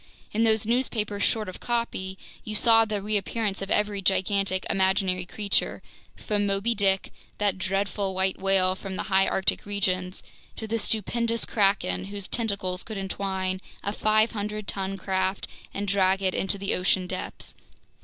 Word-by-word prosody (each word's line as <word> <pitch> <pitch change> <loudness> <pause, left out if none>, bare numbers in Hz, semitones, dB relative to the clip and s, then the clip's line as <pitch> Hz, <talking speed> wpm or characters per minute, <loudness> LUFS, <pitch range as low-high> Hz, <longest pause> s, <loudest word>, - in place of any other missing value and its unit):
In 220 +2 +1
those 220 -1 +3
newspapers 220 -4 0
short 215 -1 +1
of 185 - -7
copy, 230 -6 -2 0.3
you 215 - -4
saw 225 +1 +5
the 210 -2 -3
reappearance 210 0 -1
of 195 - -4
every 210 -1 +1
gigantic 195 0 +1
imaginary 190 -1 +1
creature, 200 +1 0 0.3
from 205 -1 -1
"Moby 200 +4 +1
Dick," 195 -3 +1 0.2
that 200 -2 0
dreadful 195 +1 -1
white 190 0 +1
whale 190 -1 +3
from 190 0 -6
the - - -2
High 190 0 +5
Arctic 190 - +1
regions, 185 -2 -1 0.3
to 220 - -5
the 225 +1 -1
stupendous 230 +2 0
kraken 200 -2 +1
whose 200 0 -3
tentacles 200 -5 -1
could 220 -2 -5
entwine 190 -1 -2 0.2
a 200 - -1
500 215 -1 +1
ton 195 0 -2
craft 190 0 -1 0.2
and 205 +1 -3
drag 195 0 +2
it 185 -1 +2
into 195 +1 0
the 195 0 -1
ocean 185 0 +2
depths. 185 0 -5
195 Hz, 155 wpm, -26 LUFS, 190-210 Hz, 0.3 s, saw